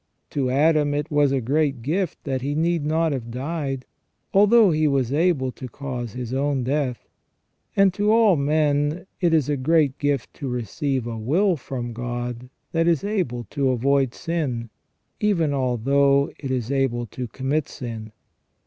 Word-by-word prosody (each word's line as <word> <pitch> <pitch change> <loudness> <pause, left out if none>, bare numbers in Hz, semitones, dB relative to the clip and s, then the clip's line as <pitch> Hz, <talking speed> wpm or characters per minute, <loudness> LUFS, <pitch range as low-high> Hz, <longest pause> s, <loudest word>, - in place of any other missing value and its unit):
To 135 -3 0
Adam 145 +2 +3
it 150 +2 -3
was 145 -2 +3
a 135 -1 +1
great 140 0 0
gift 170 +5 -2
that 135 -2 -2
he 140 +2 -2
need 165 0 +1
not 160 +2 +1
have 125 -4 -4
died, 135 +1 -3 0.5
although 210 0 +6
he 155 0 +2
was 135 -3 +1
able 150 -5 +2
to 125 +2 -8
cause 125 -5 -5
his 125 -1 -5
own 135 -1 0
death; 130 -1 -2 0.7
and 195 -2 +4
to 210 +2 +1
all 220 -4 +5
men 150 +2 +1
it 175 -3 +2
is 155 -4 +3
a 145 - +1
great 145 0 +2
gift 145 -3 -1
to 140 - -6
receive 125 +2 -2
a 115 -2 -4
will 175 - +2
from 125 -4 -5
God 120 +1 -5 0.2
that 165 0 +1
is 170 -1 +2
able 180 - -1
to 140 -2 +1
avoid 135 +1 +1
sin, 130 -9 -3 0.5
even 170 -8 +1
although 140 +2 +2
it 135 - -5
is 130 -1 -2
able 130 -3 0
to 125 +2 -6
commit 135 +5 -2
sin. 110 -3 -7
140 Hz, 165 wpm, -23 LUFS, 125-155 Hz, 0.7 s, although